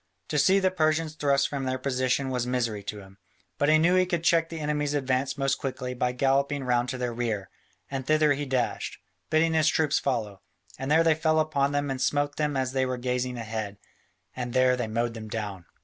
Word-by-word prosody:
To 150 Hz, -, +1 dB
see 190 Hz, +7 st, +5 dB
the 190 Hz, -1 st, +2 dB
Persians 155 Hz, -2 st, +1 dB
thrust 140 Hz, -2 st, +2 dB
from 140 Hz, -2 st, -4 dB
their 130 Hz, 0 st, -1 dB
position 130 Hz, 0 st, 0 dB
was 125 Hz, -1 st, -1 dB
misery 120 Hz, -4 st, -1 dB
to 105 Hz, 0 st, -5 dB
him, 95 Hz, +1 st, -16 dB, 0.4 s
but 145 Hz, -, +3 dB
he 155 Hz, -, +6 dB
knew 170 Hz, +3 st, +3 dB
he 185 Hz, 0 st, +3 dB
could 175 Hz, -2 st, -1 dB
check 165 Hz, -1 st, +3 dB
the 165 Hz, -, -6 dB
enemy's 150 Hz, -1 st, -1 dB
advance 135 Hz, 0 st, 0 dB
most 135 Hz, 0 st, 0 dB
quickly 130 Hz, -1 st, -4 dB
by 125 Hz, 0 st, 0 dB
galloping 140 Hz, +2 st, +1 dB
round 125 Hz, -1 st, +1 dB
to 130 Hz, -, -3 dB
their 125 Hz, -1 st, -2 dB
rear, 110 Hz, -5 st, -3 dB, 0.4 s
and 135 Hz, -1 st, -4 dB
thither 155 Hz, -1 st, +4 dB
he 145 Hz, 0 st, -4 dB
dashed, 130 Hz, -2 st, -1 dB, 0.3 s
bidding 160 Hz, +1 st, +3 dB
his 160 Hz, -1 st, +3 dB
troops 155 Hz, -2 st, +2 dB
follow, 110 Hz, -7 st, -2 dB, 0.4 s
and 135 Hz, -, -3 dB
there 160 Hz, +2 st, +5 dB
they 165 Hz, -1 st, +5 dB
fell 160 Hz, 0 st, +1 dB
upon 145 Hz, -3 st, +1 dB
them 145 Hz, -1 st, -1 dB
and 130 Hz, -1 st, -3 dB
smote 145 Hz, +2 st, 0 dB
them 150 Hz, -2 st, 0 dB
as 130 Hz, -1 st, 0 dB
they 130 Hz, 0 st, +1 dB
were 130 Hz, -1 st, -1 dB
gazing 125 Hz, 0 st, -2 dB
ahead, 110 Hz, -3 st, -4 dB, 0.6 s
and 125 Hz, -1 st, -4 dB
there 130 Hz, 0 st, +4 dB
they 120 Hz, -2 st, -2 dB
mowed 115 Hz, +2 st, -1 dB
them 110 Hz, -1 st, -8 dB
down. 100 Hz, -5 st, -5 dB
135 Hz, 215 wpm, -27 LUFS, 125-150 Hz, 0.6 s, he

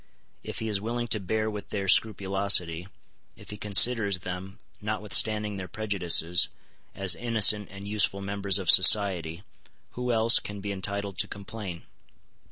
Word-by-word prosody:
If -, -, -8 dB
he 110 Hz, -, -5 dB
is 105 Hz, -2 st, -2 dB
willing 120 Hz, +2 st, -4 dB
to 110 Hz, -2 st, 0 dB
bear 110 Hz, +3 st, -3 dB
with 105 Hz, -2 st, -7 dB
their 100 Hz, -2 st, -5 dB
scrupulosity, 95 Hz, -4 st, +1 dB, 0.5 s
if -, -, -14 dB
he 105 Hz, -, -9 dB
considers 105 Hz, 0 st, +3 dB
them, 95 Hz, +2 st, -8 dB, 0.2 s
notwithstanding 105 Hz, 0 st, +1 dB
their 95 Hz, -1 st, -7 dB
prejudices, 90 Hz, -5 st, +1 dB, 0.5 s
as 95 Hz, -3 st, +4 dB
innocent 110 Hz, -2 st, +2 dB
and 100 Hz, +1 st, -11 dB
useful 105 Hz, -1 st, 0 dB
members 100 Hz, 0 st, -2 dB
of 95 Hz, -3 st, +2 dB
society, 95 Hz, -3 st, +3 dB, 0.5 s
who 125 Hz, 0 st, -4 dB
else 115 Hz, 0 st, +4 dB
can 105 Hz, 0 st, -8 dB
be 100 Hz, +1 st, -6 dB
entitled 100 Hz, 0 st, -4 dB
to -, -, +2 dB
complain? 100 Hz, -3 st, -9 dB
100 Hz, 145 wpm, -26 LUFS, 95-110 Hz, 0.5 s, as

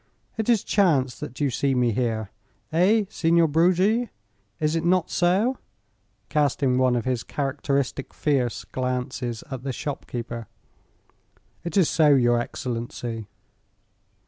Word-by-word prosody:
"It 220 Hz, 0 st, -2 dB
is 230 Hz, -4 st, +4 dB
chance 145 Hz, -, +2 dB
that 130 Hz, -, -7 dB
you 145 Hz, -3 st, +1 dB
see 135 Hz, +2 st, 0 dB
me 125 Hz, -2 st, +2 dB
here. 110 Hz, -3 st, -1 dB, 0.4 s
Eh, 200 Hz, +6 st, +4 dB
Signor 170 Hz, -4 st, +3 dB
Bruggi, 185 Hz, +9 st, +2 dB, 0.5 s
is 155 Hz, +1 st, +1 dB
it 165 Hz, -, 0 dB
not 180 Hz, 0 st, +2 dB
so?" 195 Hz, +9 st, +2 dB, 0.7 s
casting 140 Hz, -3 st, +1 dB
one 130 Hz, -1 st, +3 dB
of 120 Hz, -, -1 dB
his 130 Hz, -3 st, 0 dB
characteristic 140 Hz, -1 st, -2 dB
fierce 130 Hz, -6 st, -1 dB
glances 125 Hz, -2 st, -3 dB
at 130 Hz, -2 st, -4 dB
the 135 Hz, +1 st, -3 dB
shopkeeper. 120 Hz, -4 st, -5 dB, 1.2 s
"It 170 Hz, +2 st, -3 dB
is 185 Hz, -5 st, +5 dB
so, 150 Hz, -3 st, +4 dB
your 120 Hz, -2 st, +3 dB
excellency." 115 Hz, -2 st, -4 dB
140 Hz, 125 wpm, -25 LUFS, 125-170 Hz, 1.2 s, is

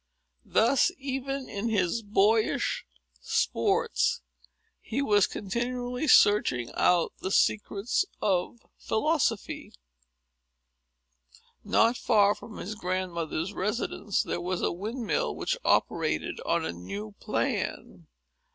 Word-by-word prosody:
Thus, 250 Hz, +9 st, +3 dB
even 270 Hz, 0 st, -4 dB
in 205 Hz, +3 st, -3 dB
his 205 Hz, +1 st, +1 dB
boyish 210 Hz, +1 st, +1 dB, 0.3 s
sports, -, -, +1 dB, 0.6 s
he 235 Hz, -, -4 dB
was 205 Hz, -8 st, +3 dB
continually 245 Hz, +6 st, -3 dB
searching 125 Hz, -, +4 dB
out 175 Hz, -2 st, +2 dB
the 190 Hz, -, -3 dB
secrets 205 Hz, -, +1 dB, 0.2 s
of 195 Hz, +4 st, -1 dB
philosophy. 235 Hz, -2 st, -1 dB, 1.9 s
Not 230 Hz, +2 st, +3 dB
far 205 Hz, -2 st, +4 dB
from 220 Hz, -, -11 dB
his 205 Hz, -, -5 dB
grandmother's 180 Hz, -3 st, -3 dB
residence 210 Hz, 0 st, -1 dB
there -, -, -3 dB
was 180 Hz, +1 st, -2 dB
a -, -, +2 dB
windmill, 230 Hz, -, -2 dB
which -, -, -1 dB
operated -, -, 0 dB
on 170 Hz, -1 st, +1 dB
a -, -, -3 dB
new 100 Hz, +5 st, -7 dB
plan. -, -, -3 dB
210 Hz, 100 wpm, -28 LUFS, 180-240 Hz, 1.9 s, searching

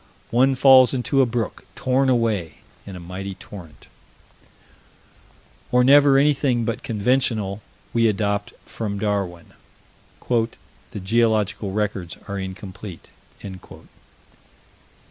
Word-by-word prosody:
One 130 Hz, +3 st, +3 dB
falls 130 Hz, 0 st, +6 dB
into 135 Hz, +2 st, +1 dB
a 130 Hz, -, +3 dB
brook 115 Hz, -3 st, -3 dB
torn 130 Hz, +1 st, +1 dB
away 110 Hz, -9 st, 0 dB, 0.3 s
in 100 Hz, -, -7 dB
a -, -, -8 dB
mighty 95 Hz, +3 st, -7 dB
torrent 90 Hz, -5 st, -12 dB, 1.9 s
Or 125 Hz, 0 st, +4 dB
never 140 Hz, +1 st, +6 dB
anything 135 Hz, -4 st, +2 dB
but 115 Hz, 0 st, -3 dB
conventional, 110 Hz, -3 st, 0 dB, 0.3 s
we 115 Hz, -1 st, +3 dB
adopt 100 Hz, -1 st, -1 dB
from 105 Hz, -3 st, -4 dB
Darwin: 100 Hz, -5 st, -3 dB, 0.7 s
"The 115 Hz, -3 st, -3 dB
geological 110 Hz, 0 st, +1 dB
records 100 Hz, -4 st, -3 dB
are 100 Hz, -1 st, -4 dB
incomplete." 95 Hz, -1 st, -8 dB
110 Hz, 100 wpm, -22 LUFS, 100-125 Hz, 1.9 s, falls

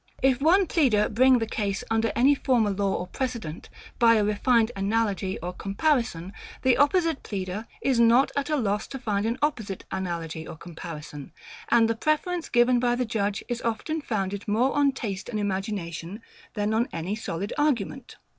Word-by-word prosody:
If 265 Hz, -1 st, +3 dB
one 365 Hz, +6 st, +5 dB
pleader 250 Hz, -12 st, +2 dB
bring 255 Hz, +3 st, +5 dB
the 225 Hz, -, -1 dB
case 205 Hz, -3 st, -2 dB
under 225 Hz, -1 st, +2 dB
any 270 Hz, +4 st, +5 dB
former 245 Hz, -6 st, +1 dB
law 195 Hz, 0 st, 0 dB
or 180 Hz, -, -3 dB
precedent, 225 Hz, -, -5 dB, 0.3 s
by 230 Hz, -1 st, +6 dB
a 215 Hz, -, +3 dB
refined 220 Hz, +3 st, +2 dB
analogy 200 Hz, -1 st, 0 dB
or 180 Hz, +1 st, -4 dB
comparison; 200 Hz, -, -1 dB, 0.3 s
the 260 Hz, -1 st, +4 dB
opposite 325 Hz, +1 st, +2 dB
pleader 195 Hz, +2 st, -5 dB, 0.2 s
is 260 Hz, -3 st, +2 dB
not 235 Hz, +3 st, +5 dB
at 280 Hz, +1 st, -1 dB
a 305 Hz, -, +2 dB
loss 210 Hz, -6 st, -1 dB
to 270 Hz, -, -6 dB
find 215 Hz, -4 st, -1 dB
an 235 Hz, +2 st, -1 dB
opposite 220 Hz, -10 st, -2 dB
analogy 170 Hz, -4 st, -4 dB
or -, -, -8 dB
comparison: 155 Hz, -3 st, -9 dB, 0.4 s
and 230 Hz, -1 st, +5 dB
the 230 Hz, -, +1 dB
preference 320 Hz, +7 st, -1 dB
given 240 Hz, 0 st, +4 dB
by 240 Hz, 0 st, +2 dB
the 250 Hz, 0 st, -1 dB
judge 205 Hz, -2 st, -1 dB
is 240 Hz, -1 st, -3 dB
often 270 Hz, +8 st, -2 dB
founded 200 Hz, -6 st, -3 dB
more 235 Hz, +6 st, +2 dB
on 285 Hz, -1 st, +4 dB
taste 210 Hz, -6 st, -5 dB
and 215 Hz, -3 st, -2 dB
imagination 195 Hz, -1 st, -4 dB, 0.3 s
than 210 Hz, 0 st, 0 dB
on 230 Hz, +2 st, +1 dB
any 170 Hz, +5 st, -3 dB
solid 200 Hz, -1 st, -4 dB
argument. 270 Hz, -3 st, -1 dB
225 Hz, 175 wpm, -26 LUFS, 195-255 Hz, 0.4 s, by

